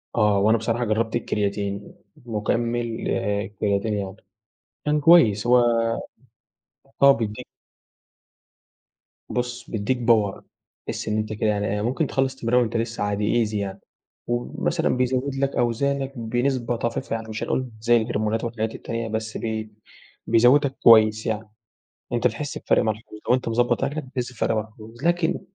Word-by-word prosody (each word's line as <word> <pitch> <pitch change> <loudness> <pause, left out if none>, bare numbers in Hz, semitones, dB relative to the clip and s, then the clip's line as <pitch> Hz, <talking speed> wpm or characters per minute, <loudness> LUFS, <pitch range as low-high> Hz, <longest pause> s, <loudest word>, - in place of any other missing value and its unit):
آه، 105 -3 +3
وأنا 110 +3 +4
بصراحة 115 +2 -1
جربت 110 +1 0
الكرياتين، 100 -3 -2 0.3
مُكمل 115 +1 -1
آآ 100 +1 -1
كرياتين 100 +1 0
يعني 100 -2 -3 0.7
كان 150 0 +2
كويس، 130 - +5
هو 125 +1 +6 1.4
آه، 140 0 +9
بيديك 115 -1 -2 1.8
بُص 120 -1 -3
بيديك 110 +4 -1
Power 110 -4 +2 0.5
تحِسّ - - -4
إن 105 0 0
أنت 110 0 -2
كده 110 0 0
يعني 105 -1 0
إيه، 105 +1 -1
ممكن 130 +7 0
تخلص 135 -1 0
تمرين 125 -1 +2
وأنت 115 -1 0
لسه 115 -1 -2
عادي 105 +3 +1
Easy 105 - -6
يعني، 100 -1 -3 0.5
ومثلًا 120 0 -1
بيزود 130 +2 0
لك 135 0 -1
أوزانك 135 +3 0
بنسبة 120 +1 -1
طفيفة، 120 +2 -3
يعني 110 -1 -6
مش 110 0 -4
هنقول 130 -1 -1
زي 120 +1 +4
الهرمونات 110 -1 -1
والحاجات 115 -1 -3
التانية، 115 0 -4
بس 110 0 -3
ب 110 -1 -3 0.6
بيزودك 130 +5 +4
كويس 110 -1 +6
يعني، 110 0 -3 0.6
أنت - - +1
بتحِسّ - - -2
بفرق - - +2
ملحوظ 110 0 -4
لو - - +5
أنت 125 -2 -1
مضبط 120 +2 +1
أكلك 145 +2 -3
بتحِسّ 130 -1 -4
بفرق 115 -1 0
ملحوظ، 110 +2 -7
لكن 175 0 +1
115 Hz, 145 wpm, -24 LUFS, 110-125 Hz, 1.8 s, آه